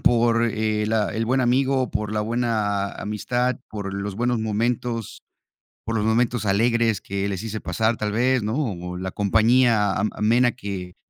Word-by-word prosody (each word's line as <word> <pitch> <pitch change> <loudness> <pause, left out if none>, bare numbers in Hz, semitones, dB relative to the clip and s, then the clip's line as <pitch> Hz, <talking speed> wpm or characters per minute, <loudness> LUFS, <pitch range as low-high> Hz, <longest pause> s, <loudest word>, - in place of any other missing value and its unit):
por 115 -1 +3
el, 110 -1 0
ah, 110 -2 +1
el 115 +1 0
buen 130 +3 +1
amigo, 130 +1 +2
por 105 -1 -2
la 105 - 0
buena 105 -3 0
amistad, 120 +4 -1
por 100 -2 -5
los 100 0 -4
buenos 120 +1 0
momentos, 115 +1 -2 0.6
por 115 0 -3
los 105 0 0
momentos 120 0 +1
alegres 115 0 +2
que 100 +1 -3
les 100 0 -4
hice 110 -1 -4
pasar, 110 0 0
tal 105 -1 -2
vez, 125 +3 +2
¿no?, 110 +3 -2
o 90 - -3
la 95 +1 -4
compañía 110 +1 +3
am 110 +2 0
amena 120 +3 +3
que 95 -6 -6
110 Hz, 170 wpm, -23 LUFS, 105-120 Hz, 0.6 s, por